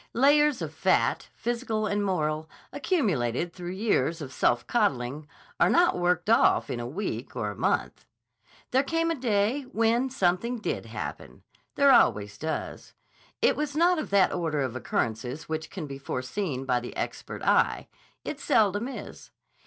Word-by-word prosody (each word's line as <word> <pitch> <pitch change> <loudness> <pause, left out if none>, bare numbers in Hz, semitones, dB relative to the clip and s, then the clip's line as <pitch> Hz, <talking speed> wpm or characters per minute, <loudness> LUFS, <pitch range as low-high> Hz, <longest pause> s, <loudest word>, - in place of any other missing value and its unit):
Layers 290 +2 +4
of - - -5
fat, - - +1
physical 235 -2 -2
and 205 0 0
moral, 155 -5 -1 0.2
accumulated 175 - 0
through 180 0 -6
years 185 - 0
of 135 -4 -7
self 120 - +1
coddling, 140 - 0 0.3
are - - +5
not 350 +1 +4
worked 175 0 +1
off 230 +1 +4
in 120 - -3
a 120 - -4
week 180 +12 -5
or - - -2
a - - -9
month. - - -1 0.6
There 260 - +4
came 330 +4 0
a - - 0
day 230 0 +1
when 235 0 +1
something 230 +1 0
did 220 - -3
happen. - - -7 0.3
There 280 -1 +5
always 105 - +3
does. 160 0 -5 0.5
It - - +4
was 295 -1 -3
not 345 +2 +3
of 310 - -4
that 195 -2 +4
order 160 -4 -1
of 130 -2 -2
occurrences 120 +3 -3
which 160 0 -4
can 180 -6 -6
be 135 -1 -8
foreseen 135 +2 -3
by 125 -2 +1
the 120 - -8
expert - - -5
eye. - - +2 0.4
It 300 - -4
seldom 210 -3 +2
is. 270 - -9
190 Hz, 160 wpm, -27 LUFS, -, 0.6 s, are